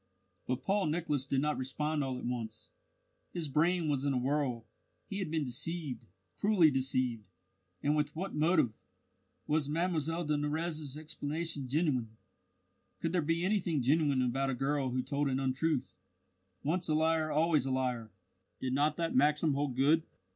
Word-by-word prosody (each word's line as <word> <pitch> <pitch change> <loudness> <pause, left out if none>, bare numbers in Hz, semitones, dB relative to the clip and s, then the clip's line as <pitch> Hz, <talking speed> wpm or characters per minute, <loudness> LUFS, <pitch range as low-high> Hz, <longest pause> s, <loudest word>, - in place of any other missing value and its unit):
But 125 0 -1
Paul 195 -2 +1
Nicholas 150 -4 -1
did 135 -1 +1
not 150 -1 0
respond 150 +3 -1
all 130 -2 -2
at - - -6
once. 115 -3 -5 0.6
His 170 -3 -2
brain 165 +4 +2
was 140 -3 0
in 140 -1 +1
a - - +1
whirl. 130 -3 0 0.4
He 195 - -4
had 185 -5 -2
been 160 -1 0
deceived, 150 +2 -4 0.3
cruelly 195 -7 +4
deceived! 130 -4 0 0.6
And 145 +1 +3
with 150 0 0
what 190 +4 -4
motive? 155 -6 +3 0.7
Was 150 -1 +1
Mlle 165 0 0
de 150 0 +1
Nurrez's 150 -1 -2
explanation 155 -1 -3
genuine? 130 -6 0 0.8
Could 165 - -1
there 180 -1 +2
be 165 +3 0
anything 175 -8 +1
genuine 140 -1 +3
about 135 +2 0
a 135 - 0
girl 135 +1 0
who 125 +1 -1
told 145 +2 0
an 130 0 0
untruth? 135 +2 0 0.7
Once 170 +4 0
a 155 - +3
liar 160 0 +2
always 155 -3 +3
a - - -1
liar! 125 -4 -1 0.5
Did 130 -1 -2
not 150 +2 +2
that 165 -1 -1
maxim 150 +3 +4
hold 140 -2 -1
good? 145 +5 +4
150 Hz, 160 wpm, -32 LUFS, 130-160 Hz, 0.8 s, cruelly